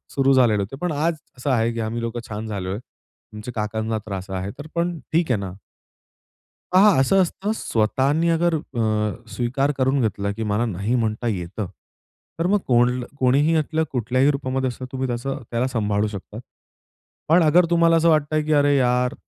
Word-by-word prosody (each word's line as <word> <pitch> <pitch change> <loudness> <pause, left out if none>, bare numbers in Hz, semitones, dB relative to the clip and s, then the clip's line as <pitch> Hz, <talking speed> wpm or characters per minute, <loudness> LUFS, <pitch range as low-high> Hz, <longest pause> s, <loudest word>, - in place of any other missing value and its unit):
सुरु 135 0 +4
झालेले 120 -6 +4
होते. 100 +7 -5
पण 180 -1 -1
आज 160 +3 0 0.2
असं 125 - -3
आहे 115 -2 +2
की 115 - -5
आम्ही 115 +2 -3
लोकं 115 +1 -3
छान 110 +1 -5
झालोय. 95 -3 -3 0.6
आमच्या 105 +3 -7
काकांना 110 +1 -2
त्रास 95 -2 -6
आहे, 95 +1 -3
तर 145 - -7
पण 170 0 0 0.2
ठीक 165 -4 +2
आहे 110 - +2
ना. 95 -2 -5 1.2
हां, 185 +1 +6
हां, 205 -7 +6
असं 190 +9 +4
असतं. 195 +4 -2
स्वतःनी 135 - +1
अगर 170 +1 +2
अ, 110 - -2
स्वीकार 135 +4 0
करून 130 +1 +2
घेतला 100 -3 -1
की 110 +2 -5
मला 105 +3 +1
नाही 105 +3 -2
म्हणता 115 -1 -1
येतं, 95 0 -3 0.7
तर 165 - 0
मग 205 +3 +3
कोण 125 0 +3 0.2
कोणीही 140 +5 +3
यातलं 160 0 +1
कुठल्याही 130 +3 +2
रूपामध्ये 135 -2 -1
असतं 125 +1 -6
तुम्ही 130 0 -2
त्याच 120 +1 -4
त्याला 125 -3 -2
सांभाळू 105 -4 0
शकता. 105 +1 -8 0.9
पण 170 +3 +5
अगर 165 +3 +5
तुम्हाला 170 -1 +4
असं 165 +1 +3
वाटतंय 155 -1 +2
की 155 - -1
"अरे 145 -1 +4
यार! 125 -1 +2
125 Hz, 175 wpm, -22 LUFS, 110-150 Hz, 1.2 s, हां